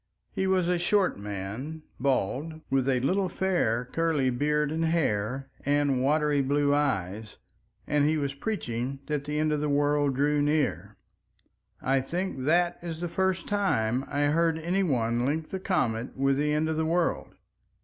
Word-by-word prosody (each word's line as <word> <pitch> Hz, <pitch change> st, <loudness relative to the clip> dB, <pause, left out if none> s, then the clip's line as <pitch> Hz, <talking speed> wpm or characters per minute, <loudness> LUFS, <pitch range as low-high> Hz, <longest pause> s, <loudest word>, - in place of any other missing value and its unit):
He 190 Hz, -, -1 dB
was 185 Hz, -2 st, +2 dB
a 180 Hz, -1 st, +1 dB
short 190 Hz, -, +2 dB
man, 105 Hz, +10 st, -6 dB, 0.2 s
bald, 140 Hz, +5 st, -1 dB
with 135 Hz, 0 st, +2 dB
a 130 Hz, -2 st, +2 dB
little 185 Hz, +7 st, +1 dB
fair 170 Hz, -12 st, 0 dB
curly 150 Hz, -2 st, 0 dB
beard 150 Hz, +3 st, 0 dB
and 165 Hz, +1 st, 0 dB
hair 135 Hz, -5 st, -1 dB
and 145 Hz, -2 st, +2 dB
watery 150 Hz, +1 st, +2 dB
blue 145 Hz, +1 st, +2 dB
eyes, 110 Hz, -7 st, -1 dB, 0.5 s
and 145 Hz, -1 st, +2 dB
he 155 Hz, +2 st, +2 dB
was 140 Hz, -2 st, -2 dB
preaching 135 Hz, -, -3 dB
that 150 Hz, -2 st, -2 dB
the 150 Hz, 0 st, -2 dB
end 155 Hz, 0 st, +1 dB
of 150 Hz, -1 st, 0 dB
the 150 Hz, -, 0 dB
world 145 Hz, -1 st, +2 dB
drew 145 Hz, +2 st, +2 dB
near. 150 Hz, 0 st, 0 dB, 0.9 s
I 135 Hz, 0 st, +2 dB
think 165 Hz, -2 st, -3 dB
that 175 Hz, +3 st, +2 dB
is 165 Hz, -2 st, -5 dB
the 175 Hz, -, -2 dB
first 190 Hz, 0 st, -1 dB
time 130 Hz, -, +1 dB
I 145 Hz, 0 st, -2 dB
heard 160 Hz, +2 st, +2 dB
any 175 Hz, +4 st, 0 dB
one 120 Hz, -8 st, +1 dB
link 155 Hz, +4 st, -1 dB
the 190 Hz, -, -3 dB
comet 120 Hz, -, -1 dB
with 135 Hz, 0 st, +2 dB
the 150 Hz, +1 st, +1 dB
end 150 Hz, +1 st, +1 dB
of 160 Hz, 0 st, -1 dB
the 160 Hz, -, +1 dB
world. 170 Hz, +1 st, 0 dB
145 Hz, 170 wpm, -27 LUFS, 130-165 Hz, 0.9 s, was